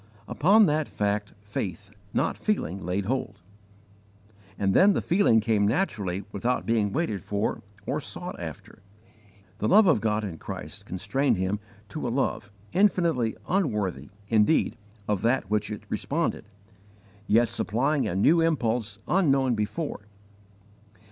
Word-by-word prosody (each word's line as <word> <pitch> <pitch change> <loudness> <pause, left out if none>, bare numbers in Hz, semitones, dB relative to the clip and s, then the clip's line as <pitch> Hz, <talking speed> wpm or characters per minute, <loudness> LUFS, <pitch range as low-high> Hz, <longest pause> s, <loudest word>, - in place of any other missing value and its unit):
Upon 205 +7 +5
that 150 -2 +1
fact 105 0 -1
faith, 100 -2 -5 0.2
not - - 0
feeling, 100 - -2
laid 95 +3 -1
hold; 115 -4 -2 1.2
and 95 -1 +1
then 200 - +6
the - - +1
feeling 170 - +4
came 105 -2 +2
naturally 105 - -1
without 120 +5 -1
being 110 -3 +1
waited 125 - -1
for 100 +1 -2 0.2
or - - -1
sought - - -6
after. - - -8 0.8
The 105 - 0
love 210 +2 +6
of 150 - +4
God 110 -1 0
in 90 -6 -5
Christ - - -8
constrained 115 +6 0
him 95 +3 -1 0.3
to 150 -2 -4
a - - 0
love 115 -4 -1 0.2
infinitely 170 - +2
unworthy, 105 - -1 0.2
indeed, 110 +8 +3 0.3
of 105 -3 0
that 120 +5 +2
to - - -22
which 105 -1 0
it 105 - -6
responded, - - -2 0.8
yet 115 +3 +4
supplying 135 +9 0
a 85 - -2
new 160 - +4
impulse 120 -10 0
unknown 135 -8 +3
before. 105 +1 -3
110 Hz, 135 wpm, -26 LUFS, 100-150 Hz, 1.2 s, then